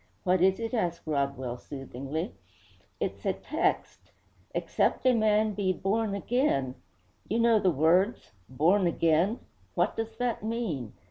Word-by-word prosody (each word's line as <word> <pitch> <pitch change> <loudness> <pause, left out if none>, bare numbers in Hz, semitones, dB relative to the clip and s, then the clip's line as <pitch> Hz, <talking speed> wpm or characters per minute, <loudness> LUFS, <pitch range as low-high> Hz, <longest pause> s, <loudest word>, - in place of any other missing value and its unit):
'What 185 -1 +2
is 190 +2 +4
it?' 230 +1 -4
asked 175 -7 -1
Rodwell 140 -5 -2
soothingly. 140 - -5 0.7
'It's - - -3
a - - +1
text, - - -2 0.4
"Except - - 0
a 255 - +6
man 215 -1 +3
be 195 -2 0
born 200 +3 -1
again 200 - 0 0.3
" - - -34
You 220 - +1
know 230 -1 +4
the 190 - +3
words, 170 - +2 0.2
Born 175 +9 +3
again. 170 +6 +2 0.3
What - - +1
does 225 0 -4
that 245 -1 -1
mean?' 210 - -3
190 Hz, 140 wpm, -28 LUFS, 155-225 Hz, 0.7 s, a